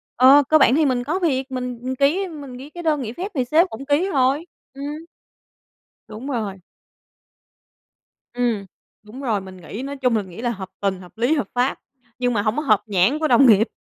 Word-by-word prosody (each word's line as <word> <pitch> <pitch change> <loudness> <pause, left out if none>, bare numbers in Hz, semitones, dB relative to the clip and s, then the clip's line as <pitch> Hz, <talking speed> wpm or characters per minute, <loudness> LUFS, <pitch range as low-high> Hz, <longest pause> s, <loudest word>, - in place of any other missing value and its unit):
ờ, 270 +4 +7
cơ 310 - +6
bản 265 - +5
thì 310 0 +3
mình 250 -3 +1
có 315 +9 -1
việc, 270 -6 -1
mình, 250 -2 -4
ừm, 260 +1 -3
ký 300 +9 +2
mình 285 -7 -9
ký 275 +3 -10
cái 345 +2 -9
đơn 305 -3 +1
nghỉ 230 -2 -5
phép 380 +7 -5
thì 255 -3 0
sếp 320 +8 +4
cũng 270 +5 -8
ký 295 +7 +1
rồi, 275 +4 +2 0.3
ừm. 275 +1 -8 1.2
Đúng 225 +5 -8
rồi. 220 -8 -3 1.8
Ừm, 240 -5 -1 0.4
đúng 220 +6 -10
rồi, 225 -7 0
mình 190 -1 -11
nghĩ 195 +7 -7
nói 280 +1 -5
chung 255 -3 +1
mình 205 -4 -1
nghĩ 180 +5 -9
là 240 - 0
hợp 190 -5 -6
tình, 195 -2 -1
hợp 180 +4 -15
lý, 240 +6 +2
hợp 285 -10 -1
pháp, 250 +2 0 0.4
nhưng 245 -1 +1
mà 205 - +1
hông 215 +5 -1
có 300 - +1
hợp 215 -8 +3
nhãn 210 +8 +2
của 315 - +1
đồng 255 +1 +6
nghiệp. 220 0 +5
255 Hz, 215 wpm, -22 LUFS, 220-285 Hz, 1.8 s, ờ